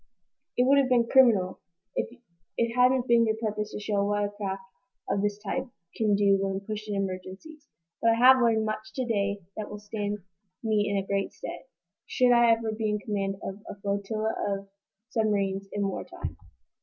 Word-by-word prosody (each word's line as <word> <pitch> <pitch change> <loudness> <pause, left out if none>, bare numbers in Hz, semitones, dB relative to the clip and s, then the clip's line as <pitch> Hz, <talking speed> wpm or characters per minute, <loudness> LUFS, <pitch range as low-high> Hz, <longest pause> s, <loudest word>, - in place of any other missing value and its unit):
"It 250 - +4
would 280 +1 +6
have 265 -2 +2
been 240 -2 +4
criminal, 225 -9 +4 0.4
if - - -1 0.5
it 230 0 +1
hadn't 250 0 +4
been 235 -1 +5
your 220 - +1
purpose 215 -1 -3
to - - -5
show 205 -1 0
what 205 0 +1
a - - -2
craft 195 -2 -4 0.4
of 200 - 0
this 205 0 0
type 240 +6 -3 0.3
can 215 -2 +2
do 200 -1 +4
when 195 0 -1
pushed 215 +1 -6
in 205 - -1
emergencies. 195 - -5 0.3
But 230 - +4
I - - +5
have 255 +2 +7
learned 225 -2 +3
much 215 0 -4
to 260 - -1
day 200 -3 -1
that 215 - -4
will 210 - -6
stand 205 0 -3 0.5
me 215 -2 +1
in 200 -1 0
great 195 0 -1
stead, - - -7 0.4
should 250 -2 +3
I 235 -1 +5
ever 225 -1 +2
be 215 0 -1
in 210 - +1
command 200 -2 -2
of 195 +2 -6
a 200 - -8
flotilla 200 +2 -1 0.2
of 195 0 -4 0.4
submarines 200 -3 0
in 205 -1 -1
war 195 - -3
time." - - -7
210 Hz, 190 wpm, -28 LUFS, 200-230 Hz, 0.5 s, have